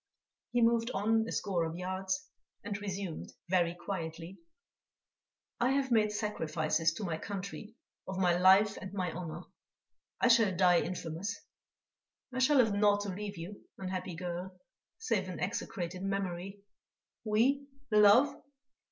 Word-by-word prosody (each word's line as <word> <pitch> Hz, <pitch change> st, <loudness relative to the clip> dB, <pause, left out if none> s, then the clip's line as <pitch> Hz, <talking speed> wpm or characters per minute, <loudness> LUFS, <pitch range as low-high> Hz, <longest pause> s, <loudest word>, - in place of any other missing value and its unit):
He 240 Hz, -1 st, +3 dB
moved 230 Hz, 0 st, +3 dB
on 220 Hz, +2 st, +2 dB
a -, -, -4 dB
score 185 Hz, -5 st, 0 dB
of 160 Hz, 0 st, -3 dB
yards, 190 Hz, -, -3 dB, 0.4 s
and 205 Hz, -, -3 dB
resumed, 195 Hz, -4 st, -5 dB, 0.2 s
very 175 Hz, -2 st, +2 dB
quietly: 170 Hz, -1 st, -6 dB, 1.2 s
"I 250 Hz, +3 st, +3 dB
have 270 Hz, -2 st, 0 dB
made 215 Hz, -2 st, +4 dB
sacrifices 160 Hz, -6 st, 0 dB
to 210 Hz, -, -5 dB
my 165 Hz, -4 st, -2 dB
country 200 Hz, +3 st, -6 dB, 0.3 s
of 190 Hz, -, -4 dB
my 180 Hz, -2 st, +3 dB
life 190 Hz, +3 st, +5 dB
and 190 Hz, -, -7 dB
my 185 Hz, -3 st, -1 dB
honour. 170 Hz, 0 st, -6 dB, 0.8 s
I -, -, +4 dB
shall 225 Hz, -6 st, +4 dB
die 180 Hz, -2 st, +5 dB
infamous; 175 Hz, +4 st, -4 dB, 0.9 s
I 255 Hz, -, -2 dB
shall 275 Hz, +3 st, +4 dB
have 225 Hz, -5 st, +4 dB
naught 205 Hz, 0 st, +3 dB
to 205 Hz, -, -3 dB
leave 200 Hz, +1 st, -5 dB
you, 175 Hz, +5 st, -8 dB
unhappy 185 Hz, -2 st, -4 dB
girl, 180 Hz, +1 st, -5 dB, 0.4 s
save 210 Hz, -, -1 dB
an 180 Hz, -, -6 dB
execrated 185 Hz, -3 st, -3 dB
memory.... 195 Hz, 0 st, -3 dB, 0.6 s
We, 250 Hz, +6 st, +2 dB, 0.2 s
love? 210 Hz, +6 st, +6 dB
195 Hz, 135 wpm, -32 LUFS, 180-215 Hz, 1.2 s, love